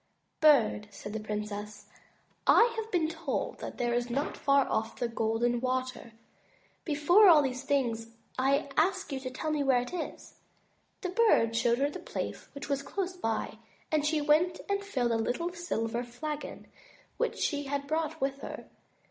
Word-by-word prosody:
"Bird," 255 -9 +4
said 205 +1 -8
the 220 - -2
princess, 210 0 -5 0.6
"I 465 0 +6
have 445 -1 -4
been 340 -4 +2
told 320 -3 -3
that - - -7
there 240 -1 0
is 240 0 0
not 275 +5 -1
far 275 -2 +3
off, 220 +1 -2
Golden 230 +2 +1
Water. 255 -2 -2 0.7
Before 340 +7 +5
all 300 -6 +7
things, 250 -4 -1 0.3
I 275 +3 +2
ask 375 +2 +1
you 270 - -2
to 260 -1 -5
tell 310 +5 -3
me 300 -1 0
where 255 -3 +3
it 250 - -9
is." 350 - -6 0.6
The 365 - -2
Bird 365 - +3
showed 235 0 +3
her 280 +2 +1
the - - -7
place - - -5
which 280 - -6
was 280 -1 0
close 370 +5 -3
by, 225 -8 -2 0.3
and 305 -2 +2
she 300 0 +1
went 310 +5 +3
and 400 0 0
filled 255 -12 0
a 230 - +2
little 290 +10 -1
silver 240 -9 -2
flagon 295 +5 -6 0.5
which - - -1
she 290 -2 -1
had 280 0 -2
brought 315 +1 -2
with 275 0 -1
her. - - -7
275 Hz, 165 wpm, -30 LUFS, 240-320 Hz, 0.7 s, all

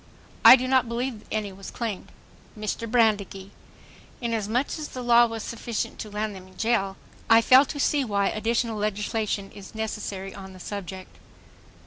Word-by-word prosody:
I - - +12
do 255 0 -2
not 260 -2 +3
believe 235 -1 -3
any 210 -2 -2
was 195 0 -9
claimed.... 225 -5 -5 0.5
MR. 215 +2 -3
BRANDEGEE: 205 -4 +1 0.7
Inasmuch 230 +2 -1
as 305 - -4
the 255 - -7
law 240 0 +6
was 225 -1 -5
sufficient 230 -1 -4
to 215 - -6
land 210 +1 -3
them 185 -1 -11
in 185 - -19
jail... 210 -4 0 0.3
I 225 0 +7
fail 260 +4 +7
to 285 - -6
see 285 0 +2
why 200 -4 +1
additional 225 0 -1
legislation 210 -1 -2
is 200 +1 -12
necessary 205 -3 -4
on 190 -1 -10
the 185 - -13
subject. 190 -1 -7
215 Hz, 160 wpm, -25 LUFS, 200-235 Hz, 0.7 s, I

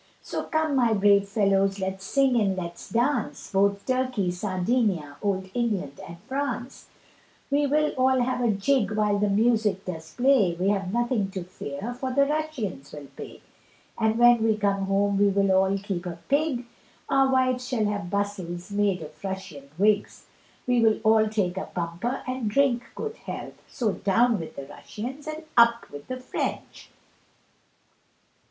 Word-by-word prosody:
So - - -4
come 315 -2 0
my 240 -4 +3
brave 200 0 +4
fellows 195 -2 +2
let's 190 0 -4
sing 270 +2 +2
and 195 -2 +1
let's 175 -1 -6
dance, 240 0 -1
Both 200 0 +2
Turkey, 255 -8 0
Sardinnia, 185 - -1
old 190 -2 -2
England 205 - -2
and 170 - -9
France; 260 0 -4 0.6
We 285 +1 +2
will 300 +2 +2
all 260 0 +2
have 250 0 0
a 235 - +3
jig 215 +3 +1
while 210 -1 +1
the 205 0 +2
music 215 -2 +2
does 160 -3 -6
play, 245 -9 +3
We 190 +2 +2
have 195 -2 0
nothing 235 -3 0
to 190 -2 -5
fear 180 +4 -6
for 260 +1 -4
the 280 +2 +4
Russians 280 - -3
will 145 -2 -10
pay; - - -9 0.5
And 220 -1 +1
when 240 -1 +6
we 220 -1 +2
come 200 -2 0
home 200 +1 +1
we 205 - +5
will 195 0 +2
all 190 +1 +3
keep 195 -3 -4
a 170 -1 -5
pig, 280 -4 +1 0.4
Our 270 -1 +3
wives 255 -1 +1
shall 235 -5 0
have 205 -4 -2
bustles 195 -2 -3
made 200 -4 +1
of 150 - -13
Russian 190 -8 -6
wigs, 205 +1 +1 0.4
We 245 -1 +2
will 220 -1 +3
all 220 0 +4
take 195 -4 -1
a 190 - -4
bumper 175 +9 -3
and 255 -4 -2
drink 250 0 +2
good 445 0 -5
health, - - -8
So 225 -4 -1
down 225 +4 +2
with 160 -1 -8
the 140 - -7
Russians 245 - -8
and 310 +1 -5
up 235 0 +4
with 145 0 -10
the 255 - -4
French. 255 - -5
210 Hz, 165 wpm, -26 LUFS, 190-250 Hz, 0.6 s, when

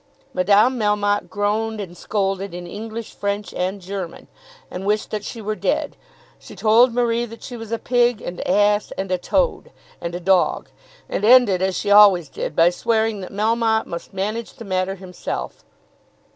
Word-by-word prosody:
Madame 205 +7 +3
Melmotte 205 -1 +1
groaned, 215 +2 -1
and 180 -4 -7
scolded 195 -1 -2
in 175 0 -7
English, 220 +4 -7
French, 200 +1 -3
and 185 +2 -2
German, 190 -1 -7 0.4
and 180 - -5
wished 210 +1 0
that 210 -1 -3
she 225 +1 -7
were 215 +1 -1
dead; - - -1 0.4
she - - -13
told 230 +3 +5
Marie 235 0 +1
that 230 +1 -12
she 250 - -7
was 225 -2 -8
a 230 - 0
pig, 240 -1 +2
and 175 -3 -6
ass, 205 +2 +3
and 190 -1 -3
a 185 - +1
toad, - - 0 0.3
and 170 0 -4
a - - -3
dog. 185 0 +2 0.4
And - - -3
ended, 220 -5 +6
as 190 -1 0
she 205 - -1
always 200 -7 +7
did - - -5
end, 155 - -5
by 170 +1 +5
swearing 220 +3 0
that 185 - -8
Melmotte 220 +2 +1
must 170 - -7
manage 210 +4 -3
the 230 -4 -11
matter 185 0 -1
himself. 180 - -6
205 Hz, 175 wpm, -21 LUFS, 190-225 Hz, 0.4 s, always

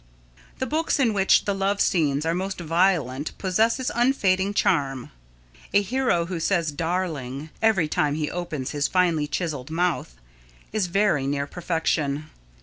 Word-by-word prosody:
The 260 - -2
books 310 +3 0
in 235 -5 +3
which 195 -1 +3
the 200 - +1
love 195 +1 0
scenes 150 -4 +1
are 165 - +1
most 190 +2 -3
violent 165 -5 0
possess 215 +6 +1
unfading 205 -6 +2
charm. 135 -7 0 0.6
A 200 - +5
hero 235 -6 +1
who 175 -1 -4
says 165 -2 +1
"darling" 155 -4 -3
every 215 -8 +3
time 150 -1 0
he 150 -1 -1
opens 155 -7 -4
his 145 -1 0
finely 170 -5 +1
chiselled 150 -5 -3
mouth 165 - -1 0.6
is 210 -4 +1
very 175 -7 +1
near 140 0 -1
perfection. 155 -3 -2
170 Hz, 145 wpm, -24 LUFS, 150-195 Hz, 0.6 s, A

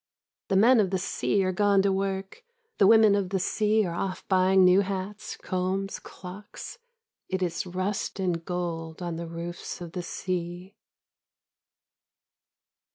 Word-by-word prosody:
The 195 - 0
men 230 +5 +6
of 200 -3 +3
the 190 - 0
sea 195 +2 0
are 185 - +1
gone 200 0 +3
to 200 - +3
work; 195 - -3 0.4
the 195 - +6
women 220 -1 +7
of 200 -2 0
the 195 - 0
sea 215 +3 +2
are 170 - -3
off 185 +2 -4
buying 190 0 +4
new 180 +2 +6
hats, 200 +2 -4
combs, 190 +1 -2
clocks; 195 - -10 0.5
it 190 0 -1
is 175 +1 -2
rust 185 +3 -3
and 175 -3 -1
gold 170 -1 -4
on 170 -2 -3
the 170 0 -5
roofs 170 +1 -6
of 175 -2 -7
the 180 - -4
sea. 180 +1 -4
190 Hz, 150 wpm, -27 LUFS, 180-200 Hz, 0.5 s, women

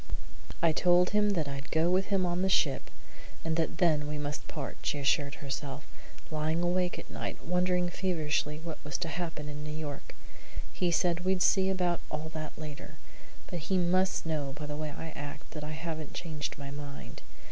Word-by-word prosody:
"I 165 - +7
told 175 +2 +5
him 210 0 +4
that 160 -6 +1
I'd 140 0 -5
go 160 +1 +3
with 190 +1 +3
him 195 -2 +3
on 175 +1 +1
the 190 - +3
ship, 140 -8 +3 0.6
and 160 -1 +1
that 165 0 +1
then 155 -5 +4
we 150 0 -2
must 145 0 -3
part," 140 -3 -4
she - - 0
assured 140 0 +2
herself, 140 0 -4 0.5
lying 155 +2 +1
awake 180 0 +2
at - - -8
night, - - -4
wondering 180 0 +3
feverishly 155 -5 0
what 160 0 -6
was 150 -2 -2
to 175 - -1
happen 160 -2 -3
in 150 0 -5
New 150 - -4
York. 145 -3 -5 0.6
"He 180 - +2
said 170 0 +3
we'd 185 0 +2
see 190 -1 +5
about 180 -2 +1
all 155 +1 -3
that 155 -1 -5
later, 150 -2 -7 0.5
but 175 - -4
he 185 +4 +1
must 185 +1 +3
know 150 -4 -1
by 150 - -4
the 150 0 -3
way 155 0 -2
I 160 +2 -5
act 145 -1 -7
that 150 -2 -5
I 150 +1 -4
haven't 155 -1 -4
changed 155 -4 -3
my 140 0 -6
mind. 145 -1 -7
160 Hz, 190 wpm, -31 LUFS, 150-175 Hz, 0.6 s, I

